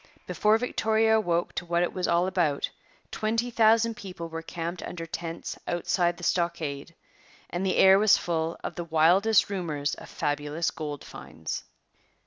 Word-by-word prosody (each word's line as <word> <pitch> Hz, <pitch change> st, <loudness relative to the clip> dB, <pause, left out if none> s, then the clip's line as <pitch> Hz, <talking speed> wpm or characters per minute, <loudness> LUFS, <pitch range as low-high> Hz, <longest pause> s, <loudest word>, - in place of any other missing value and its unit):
Before 215 Hz, +1 st, +3 dB
Victoria 220 Hz, -2 st, +2 dB
awoke 175 Hz, -5 st, 0 dB
to -, -, -3 dB
what 170 Hz, +1 st, +2 dB
it 175 Hz, -, -2 dB
was 180 Hz, -1 st, -1 dB
all 170 Hz, +1 st, +3 dB
about, 175 Hz, -7 st, 0 dB, 0.4 s
twenty 230 Hz, +3 st, -1 dB
thousand 225 Hz, 0 st, +4 dB
people 180 Hz, -5 st, -7 dB
were 165 Hz, 0 st, -5 dB
camped 170 Hz, +1 st, -5 dB
under 165 Hz, -2 st, -6 dB
tents 165 Hz, 0 st, -6 dB
outside 175 Hz, 0 st, 0 dB
the 175 Hz, -, -12 dB
stockade, 170 Hz, -4 st, -2 dB, 0.6 s
and 175 Hz, +2 st, -2 dB
the 190 Hz, -, +1 dB
air 190 Hz, 0 st, +7 dB
was 210 Hz, -1 st, +6 dB
full 165 Hz, -1 st, -2 dB
of -, -, -4 dB
the 175 Hz, -, -5 dB
wildest 175 Hz, +7 st, +4 dB
rumours 155 Hz, -7 st, -2 dB
of -, -, -9 dB
fabulous 145 Hz, +3 st, -2 dB
gold 150 Hz, -2 st, -6 dB
finds. 75 Hz, +4 st, -7 dB
175 Hz, 155 wpm, -27 LUFS, 165-200 Hz, 0.6 s, air